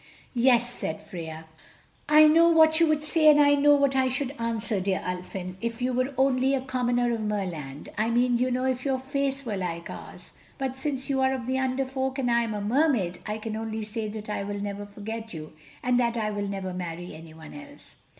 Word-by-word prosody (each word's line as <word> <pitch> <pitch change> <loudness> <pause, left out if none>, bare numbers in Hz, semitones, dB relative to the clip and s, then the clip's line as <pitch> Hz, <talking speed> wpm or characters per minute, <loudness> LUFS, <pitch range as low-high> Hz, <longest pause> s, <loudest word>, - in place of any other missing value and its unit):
"Yes," 240 -1 +4
said 160 - -5
Freia; 160 -2 -7 0.6
"I 305 +1 +8
know 330 +2 +6
what 315 -1 +5
you 335 - +5
would 305 -1 +1
say 310 0 +4
and 295 -1 +6
I 285 0 +6
know 290 +1 +5
what 280 -1 +2
I 260 -1 +3
should 260 +1 -2
answer, 230 -2 -1
dear 190 0 0
Ulfin, 180 0 -5
if 230 -1 -3
you 250 0 0
were 255 +2 -1
only 265 0 +3
a 265 - -1
commoner 245 -2 0
of 230 - -2
Merland... 175 -10 -4
I 220 +1 +2
mean, 240 +1 +2
you 255 +1 +2
know, 255 +1 -1
if 255 -1 -1
your 270 -2 +1
face 275 +1 -2
were 210 -4 -2
like 170 -2 -4
ours. - - -10 0.3
But 265 -2 -3
since 265 -1 -3
you 270 -2 0
are 265 0 +2
of 250 -3 -5
the 260 +1 0
Under 265 0 0
Folk 265 0 -3
and 250 -3 0
I 235 0 +4
am 225 -2 -2
a 205 - -3
Mermaid, 220 - +1
I 210 0 -2
can 220 0 -5
only 220 0 -4
say 215 +1 -4
that 210 0 -7
I 210 - -2
will 205 0 -4
never 205 0 -5
forget 220 +1 -7
you, 155 -1 -8 0.3
and 250 0 +2
that 235 -1 +1
I 215 -1 -1
will 205 -1 -3
never 195 -2 -4
marry 175 -1 -6
anyone 160 0 -12
else." 285 0 -12
240 Hz, 220 wpm, -26 LUFS, 205-265 Hz, 0.6 s, I